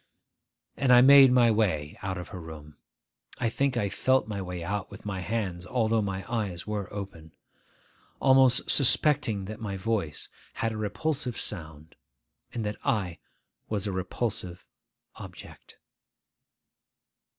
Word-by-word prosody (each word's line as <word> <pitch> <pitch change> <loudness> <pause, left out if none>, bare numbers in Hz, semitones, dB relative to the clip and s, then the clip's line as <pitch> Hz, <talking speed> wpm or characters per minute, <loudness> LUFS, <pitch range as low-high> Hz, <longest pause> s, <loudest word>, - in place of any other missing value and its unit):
and 135 -2 +2
I 125 0 +8
made 135 0 +8
my 120 -2 +5
way 90 -9 0
out 95 -1 -3
of 90 - -7
her 90 - -8
room 75 -2 -11 0.6
(I 120 - 0
think 135 +1 0
I 105 - +1
felt 130 +6 +1
my 100 -2 -4
way 90 -2 -5
out 100 +2 -3
with 100 - -12
my 100 -2 -3
hands, 95 -2 -3
although 115 -1 +1
my 95 -2 -4
eyes 105 -7 -3
were 105 -3 -4
open), 95 -6 -8 0.9
almost 130 -1 +4
suspecting 125 -7 +3
that 110 +2 -7
my 100 -4 -4
voice 95 -7 -2 0.3
had 115 - -2
a 110 - -5
repulsive 120 +5 -2
sound, 80 -4 -4 0.6
and 115 -3 -4
that 105 0 -3
I 95 -6 -1 0.5
was 105 -2 -1
a 100 - -2
repulsive 95 -1 -4 0.5
object. - - -12
105 Hz, 140 wpm, -27 LUFS, 90-120 Hz, 0.9 s, I